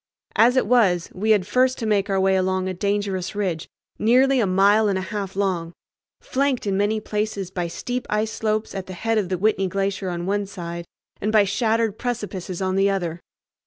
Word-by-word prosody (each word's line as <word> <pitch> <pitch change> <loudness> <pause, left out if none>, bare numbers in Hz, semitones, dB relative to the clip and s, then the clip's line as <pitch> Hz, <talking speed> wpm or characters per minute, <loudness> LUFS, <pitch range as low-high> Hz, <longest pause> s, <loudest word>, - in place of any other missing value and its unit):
As 245 +3 +5
it - - +3
was, 195 -9 +3
we 215 +4 -2
had 205 -4 +4
first 255 +5 +2
to 230 - -4
make 205 -2 +1
our 195 -1 +1
way 190 0 +3
along 185 0 0
a 190 - -2
dangerous 200 0 -2
ridge 185 -6 -2 0.3
nearly 255 +4 +4
a 215 - +2
mile 200 +3 +4
and 195 -2 +1
a - - -2
half 200 -3 -4
long, 180 -4 -1 0.5
flanked 270 -2 -1
in 200 -1 0
many 205 +2 +1
places 210 -3 -3
by 175 -2 -2
steep 245 +9 -4
ice 215 +1 0
slopes 215 0 -1
at 195 -2 -5
the 185 - -7
head 225 +4 0
of 190 -4 -2
the 185 - 0
Whitney 195 0 +1
Glacier 195 0 -2
on 175 -1 -4
one 200 +1 -1
side 170 -3 -6 0.4
and 210 - 0
by 215 -2 +5
shattered 220 +1 0
precipices 200 -7 -4
on 185 0 0
the 195 +1 +4
other. 175 -4 -2
200 Hz, 200 wpm, -23 LUFS, 185-220 Hz, 0.5 s, As